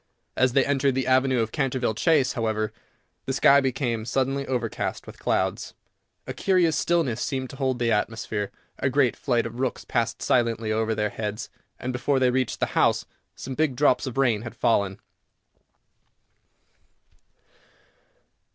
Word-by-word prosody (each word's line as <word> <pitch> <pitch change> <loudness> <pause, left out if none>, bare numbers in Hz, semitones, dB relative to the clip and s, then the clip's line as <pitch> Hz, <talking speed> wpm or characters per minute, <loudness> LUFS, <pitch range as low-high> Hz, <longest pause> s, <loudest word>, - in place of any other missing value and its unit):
As 130 -1 +2
they 135 -1 +4
entered 135 -1 +1
the 130 -1 0
avenue 130 -1 +3
of 110 -1 -2
Canterville 130 -5 0
Chase, 140 +1 +2
however, 110 -2 -1 0.5
the 135 - 0
sky 140 +1 +5
became 130 -4 -1
suddenly 135 +3 -1
overcast 120 -4 -3
with - - -12
clouds, - - -1 0.5
a - - -5
curious 180 -5 +2
stillness 145 -7 +1
seemed 130 -2 -3
to - - -10
hold 130 -2 0
the 120 -1 0
atmosphere, 105 -1 -1 0.3
a 130 - +1
great 130 -2 +2
flight 120 -4 0
of 115 +1 -7
rooks 130 -2 -2
passed 115 -2 -1
silently 115 -3 +1
over 110 0 0
their 105 -1 -1
heads, 105 -1 -5 0.3
and, 130 +1 -4
before 125 +3 0
they 130 -1 +3
reached 130 -1 -1
the - - +2
house, - - +2 0.3
some 130 - -6
big 150 -1 0
drops 130 -2 +2
of 130 - -6
rain 120 -6 +2
had 120 0 -8
fallen. 100 -4 +1
125 Hz, 150 wpm, -25 LUFS, 115-135 Hz, 0.5 s, sky